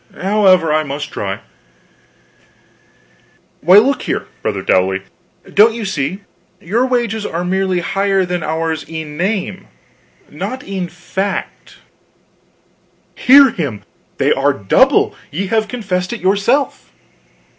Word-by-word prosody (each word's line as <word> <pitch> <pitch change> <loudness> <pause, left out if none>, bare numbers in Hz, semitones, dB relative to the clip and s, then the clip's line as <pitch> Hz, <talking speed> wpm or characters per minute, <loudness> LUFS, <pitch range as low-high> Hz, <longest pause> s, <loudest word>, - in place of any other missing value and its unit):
However, 185 -5 +3
I 155 - +3
must 145 0 -5
try: 100 -1 -4 2.2
"Why, 180 +5 +6
look 265 +7 +4
here, - - -3 0.2
brother - - -2
Dowley, 95 +1 +1 0.5
don't 220 +2 +5
you 230 -2 -4
see? 185 +1 -3 0.4
Your 230 +9 0
wages 235 -4 -1
are 175 -2 -3
merely 185 -1 0
higher 195 +1 0
than 180 -1 -3
ours 160 0 -2
in 160 -2 -6
name, 190 +2 -2 0.6
not 255 0 -6
in 190 -2 -4
fact." 190 +3 -5 1.4
"Hear 275 0 +6
him! 135 - -4 0.3
They - - +3
are 140 +1 +1
the 100 - -13
double 95 - +4 0.2
ye 175 +8 -3
have 220 -1 +2
confessed 185 -6 -3
it 235 - -5
yourself." 205 +9 0
185 Hz, 120 wpm, -16 LUFS, 160-210 Hz, 2.2 s, Why